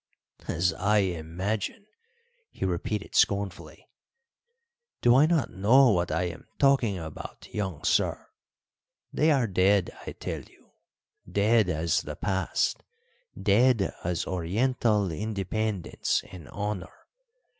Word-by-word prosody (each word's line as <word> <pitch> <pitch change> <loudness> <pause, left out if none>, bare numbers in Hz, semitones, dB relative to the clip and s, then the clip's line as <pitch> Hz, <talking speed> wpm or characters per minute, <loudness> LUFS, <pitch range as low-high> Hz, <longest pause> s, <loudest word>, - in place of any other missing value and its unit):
"As 90 +3 +1
I 105 +2 +3
imagine!" 95 - -2 0.6
he - - -5
repeated 95 +3 -3
scornfully. 100 -2 0 1.1
"Do 120 0 +5
I 145 +4 +6
not 160 -7 +1
know 115 +7 +5
what 90 -3 0
I - - 0
am 85 -1 -6
talking 135 -8 +3
about, 80 -3 -8
young 95 -7 -3
sir? - - +1 0.9
They 155 - +3
are 135 -5 +3
dead, 95 -1 +2 0.2
I - - -4
tell - - -5
you - - -22 0.6
dead 105 0 +3
as 80 -1 +1
the - - -7
past, 95 -1 -1 0.6
dead 115 +1 +3
as 85 0 -1
Oriental 105 +2 0
independence 105 +1 -2
and 85 -6 -11
honour. 105 -2 -5
100 Hz, 115 wpm, -27 LUFS, 90-110 Hz, 1.1 s, I